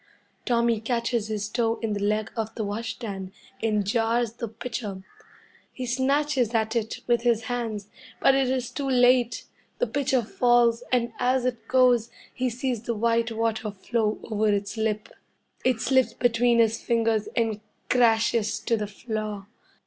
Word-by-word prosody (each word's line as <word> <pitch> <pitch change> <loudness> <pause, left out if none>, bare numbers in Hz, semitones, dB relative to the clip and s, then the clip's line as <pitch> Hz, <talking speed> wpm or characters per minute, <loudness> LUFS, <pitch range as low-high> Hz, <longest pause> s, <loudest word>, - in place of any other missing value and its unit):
Tommy 235 -2 +2
catches 235 -1 -1
his 210 -2 -2
toe 225 +1 0
in 220 -2 0
the 205 - -2
leg 210 +1 0
of 225 -1 -3
the 220 - -2
wash 210 +3 -3
stand, 195 -5 -6 0.3
and 210 -2 +1
jars 230 +2 +1
the 235 0 -5
pitcher. 225 -3 -6 0.7
He 255 - -5
snatches 260 -1 +1
at 220 +1 +1
it 220 -2 -2
with 240 -1 +2
his 235 -2 +2
hands, 225 -4 -3 0.3
but 270 - +5
it 270 -1 +2
is 255 -2 -1
too 280 -2 -3
late. 245 -1 +3 0.3
The - - +1
pitcher 270 - 0
falls, 240 +1 +3
and 235 -2 +1
as 250 0 +2
it 245 -2 -3
goes, 250 -3 +4 0.2
he 255 0 -1
sees 245 -1 -2
the 235 0 -3
white 230 +1 +1
water 225 -1 -1
flow 210 +2 -1
over 215 -1 0
its 200 +1 -1
lip. 220 -1 -1 0.6
It 250 -3 +1
slips 260 -1 +2
between 240 0 +3
his 225 -1 +3
fingers 225 -2 +1
and 220 -3 0 0.3
crashes 230 -2 +2
to 230 - +1
the 210 -1 -3
floor. 210 -1 -5
230 Hz, 160 wpm, -26 LUFS, 215-245 Hz, 0.7 s, but